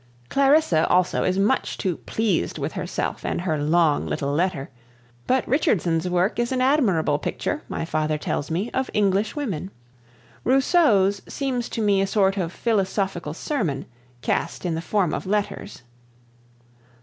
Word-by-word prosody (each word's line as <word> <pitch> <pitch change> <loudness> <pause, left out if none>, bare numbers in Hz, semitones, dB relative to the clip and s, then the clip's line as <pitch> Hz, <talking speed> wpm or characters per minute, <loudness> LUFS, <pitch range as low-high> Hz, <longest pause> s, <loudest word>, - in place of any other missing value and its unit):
Clarissa 275 - +3
also 180 0 +2
is 185 +1 +1
much 210 +7 +1
too 185 -5 -1
pleased 215 -6 -1
with - - -3
herself - - -3
and - - -2
her 160 -5 -1
long, 155 0 +2
little 140 0 -2
letter; 160 -4 -1 0.6
but 260 -1 +1
Richardson's 180 - +1
work 180 +6 +1
is 240 +1 0
an 260 - 0
admirable 215 - +2
picture, - - -3
my - - -3
father 155 -1 -1
tells 150 - -3
me, 185 +8 -2
of 260 0 -1
English 205 +1 +1
women. 200 - -3 0.7
Rousseau's 245 - +3
seems 255 -4 -2
to 225 - -2
me 200 -2 +3
a 195 - +1
sort 195 -1 +2
of 175 -4 -2
philosophical 190 -7 -1
sermon, 180 - -2 0.4
cast - - -1
in 175 - 0
the 160 - -2
form 180 -2 0
of - - -4
letters. 205 -10 -2
195 Hz, 150 wpm, -23 LUFS, 165-235 Hz, 0.7 s, Clarissa